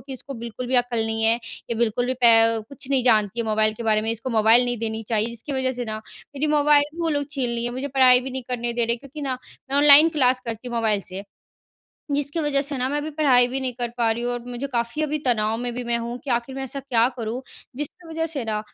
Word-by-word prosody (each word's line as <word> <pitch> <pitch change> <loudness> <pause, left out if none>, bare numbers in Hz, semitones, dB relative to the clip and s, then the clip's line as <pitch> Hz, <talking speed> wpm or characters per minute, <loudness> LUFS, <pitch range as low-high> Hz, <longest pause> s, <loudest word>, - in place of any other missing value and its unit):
कि, 270 - -7
"इसको 270 +2 -8
बिल्कुल 235 +1 -6
भी 255 - -2
अक्ल 245 -1 +1
नहीं 225 0 -2
है। 225 +1 +4
ये 235 0 -7
बिल्कुल 235 +1 0
भी 255 - -1
पे 225 0 +6
कुछ 275 -2 -12
नहीं 265 -2 +2
जानती 220 -2 +2
है 225 - -3
मोबाइल 215 0 +2
के 235 - -7
बारे 215 -1 +2
में, 225 - -1
इसको 230 +3 -4
मोबाइल 225 +2 +5
नहीं 245 -2 -2
देनी 225 0 -3
चाहिए।" 220 0 0
जिसकी 235 +5 -6
वजह 260 -1 0
से 245 -1 -4
ना, 215 -1 -4 0.4
मेरी 290 +2 0
मोबाइल 295 0 +5
भी 340 - -7
वो 330 - 0
लोग 285 -2 -1
छीन 270 -5 -1
लिए 235 0 -2
हैं। 240 - -3
मुझे 260 +3 -4
पढ़ाई 255 -2 +5
भी 265 - -6
नहीं 260 0 -5
करने 240 -1 -2
दे 235 0 0
रहे, 235 +1 0
क्योंकि 275 +4 -11
ना, 260 -2 -2 0.3
मैं 275 - +1
ऑनलाइन 295 +2 +8
क्लास 255 -1 +3
करती 230 +2 -5
हूँ 240 - -6
मोबाइल 220 -3 +1
से, 190 0 -5 0.9
जिसकी 285 +3 -1
वज़ह 290 -2 +1
से 280 -1 -4
ना 250 - 0
मैं 290 - -1
अभी 295 +1 -3
पढ़ाई 270 -5 +4
भी 265 +2 -2
नहीं 255 -1 -2
कर 240 - 0
पा 230 -2 +2
रही 235 +2 -3
हूँ 245 - -1
और 245 - -5
मुझे 245 +3 -4
काफ़ी 235 +5 -1
अभी 305 0 -1
तनाव 225 -2 +1
में 245 0 -3
भी 250 - -3
मैं 235 0 0
हूँ। 235 +1 -5
कि 280 - -6
आखिर 240 +2 -1
मैं 270 - -4
ऐसा 270 +1 -6
क्या 245 -3 +2
करूँ? 230 +2 -4 0.3
जिसकी 295 +5 -6
वज़ह 325 0 -2
से 300 -6 -4
ना, 215 -1 -1
245 Hz, 270 wpm, -23 LUFS, 230-275 Hz, 0.9 s, ऑनलाइन